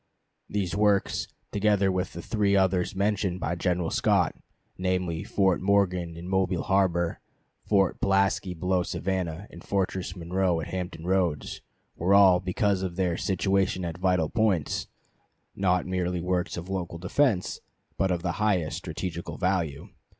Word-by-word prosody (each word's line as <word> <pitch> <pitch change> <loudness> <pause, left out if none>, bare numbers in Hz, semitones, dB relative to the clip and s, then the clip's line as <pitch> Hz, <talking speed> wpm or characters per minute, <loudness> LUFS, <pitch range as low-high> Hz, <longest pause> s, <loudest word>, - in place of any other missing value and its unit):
These 100 -4 -1
works, 105 -1 +2 0.2
together 100 -2 +2
with 90 0 -2
the 85 - -7
three 105 -3 +1
others 95 0 +2
mentioned 100 -2 0
by 85 -1 -1
General 90 -1 -1
Scott, - - +2 0.4
namely, 90 -3 -1
Fort 95 -3 +1
Morgan 90 -4 +1
in 85 +1 -8
Mobile 95 -2 0
harbor, 90 -3 +1 0.5
Fort 95 -3 +2
Pulaski 95 -1 +1
below 90 +2 +1
Savannah, 90 -1 -3
and 85 - -12
Fortress 95 -3 -2
Monroe 90 0 0
at 80 - -5
Hampton 90 -3 -5
Roads, 90 -6 0 0.3
were 95 +4 +3
all, 95 -3 +7
because 95 +1 0
of 90 -2 -3
their 90 -2 0
situation 95 0 0
at 85 0 -5
vital 90 -4 +2
points, 110 -9 +1 0.7
not 90 -2 +1
merely 90 -1 -1
works 90 +1 -1
of 85 +1 -6
local 90 -3 -4
defense, 95 +3 +1 0.4
but 95 - +1
of 90 -2 -1
the 90 - 0
highest 95 -7 +1
strategical 85 -2 -5
value. 90 -7 -1
90 Hz, 145 wpm, -27 LUFS, 85-95 Hz, 0.7 s, all